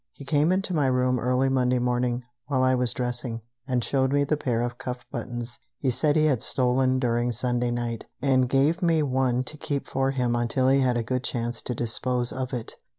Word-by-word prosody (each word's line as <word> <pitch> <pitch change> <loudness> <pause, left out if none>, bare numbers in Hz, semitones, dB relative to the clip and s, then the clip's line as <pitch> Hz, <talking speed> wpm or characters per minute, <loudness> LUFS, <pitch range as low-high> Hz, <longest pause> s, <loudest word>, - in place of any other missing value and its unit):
He 140 - -11
came 150 +4 +2
into 190 0 0
my 145 -5 +2
room 125 -1 +1
early 125 +3 +1
Monday 125 -1 +2
morning, 125 0 0 0.2
while 130 -3 +1
I 130 0 +4
was 125 -1 +2
dressing, 120 -1 -3 0.3
and 125 -3 0
showed 130 +1 +1
me 145 0 +3
the 145 +2 +1
pair 120 -5 -1
of 120 0 -4
cuff 125 0 -5
buttons 120 0 -5 0.2
he 130 - 0
said 145 +4 +2
he 155 -1 +4
had 135 -7 +2
stolen 130 0 +2
during 120 -1 0
Sunday 120 +1 -1
night, 120 -1 -3
and 130 -1 +2
gave 145 +7 +2
me 165 -3 +3
one 130 -2 +1
to 150 +4 -6
keep 145 -3 -3
for 135 0 0
him 125 -3 0
until 120 +2 +1
he 135 +1 +4
had 125 -2 +2
a 115 - -1
good 125 +2 -2
chance 120 -1 -2
to 125 - -3
dispose 120 +1 +1
of 130 -1 -4
it. 120 -4 -4
125 Hz, 215 wpm, -26 LUFS, 120-135 Hz, 0.3 s, I